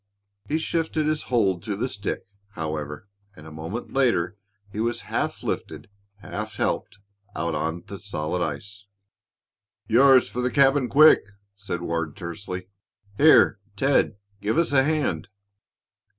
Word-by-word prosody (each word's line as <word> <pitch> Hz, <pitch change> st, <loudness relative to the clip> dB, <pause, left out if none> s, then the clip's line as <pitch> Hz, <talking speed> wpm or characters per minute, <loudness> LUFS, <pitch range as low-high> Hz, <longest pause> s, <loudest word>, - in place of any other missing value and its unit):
He 155 Hz, -, +1 dB
shifted 160 Hz, -1 st, -1 dB
his 155 Hz, 0 st, 0 dB
hold 100 Hz, -8 st, +2 dB
to 105 Hz, +2 st, -3 dB
the 120 Hz, +6 st, -1 dB
stick, 105 Hz, -5 st, -4 dB, 0.3 s
however, 75 Hz, +1 st, -5 dB, 0.3 s
and 75 Hz, -, -13 dB
a 80 Hz, -, -10 dB
moment 80 Hz, +9 st, -6 dB
later 115 Hz, -9 st, +2 dB, 0.4 s
he 105 Hz, -, -6 dB
was 115 Hz, +1 st, -1 dB
half -, -, -3 dB
lifted, -, -, -4 dB, 0.3 s
half 110 Hz, 0 st, -6 dB
helped -, -, -2 dB, 0.4 s
out 85 Hz, +1 st, -2 dB
on 80 Hz, +3 st, -2 dB
the 100 Hz, -, -8 dB
solid 90 Hz, -3 st, -3 dB
ice. 100 Hz, +7 st, -6 dB, 1.0 s
"Yours 130 Hz, +2 st, +6 dB
for 125 Hz, -, -4 dB
the 125 Hz, -, +1 dB
cabin, 135 Hz, 0 st, +3 dB
quick!" 155 Hz, +2 st, +7 dB, 0.3 s
said 100 Hz, -3 st, -5 dB
Ward, 85 Hz, -2 st, -2 dB
tersely. 90 Hz, +1 st, -6 dB, 0.5 s
"Here, 150 Hz, -8 st, +6 dB, 0.2 s
Ted, 135 Hz, -4 st, +2 dB, 0.3 s
give 105 Hz, +6 st, 0 dB
us 170 Hz, -3 st, +2 dB
a 135 Hz, -2 st, +5 dB
hand." 145 Hz, -, 0 dB
100 Hz, 135 wpm, -25 LUFS, 85-135 Hz, 1.0 s, quick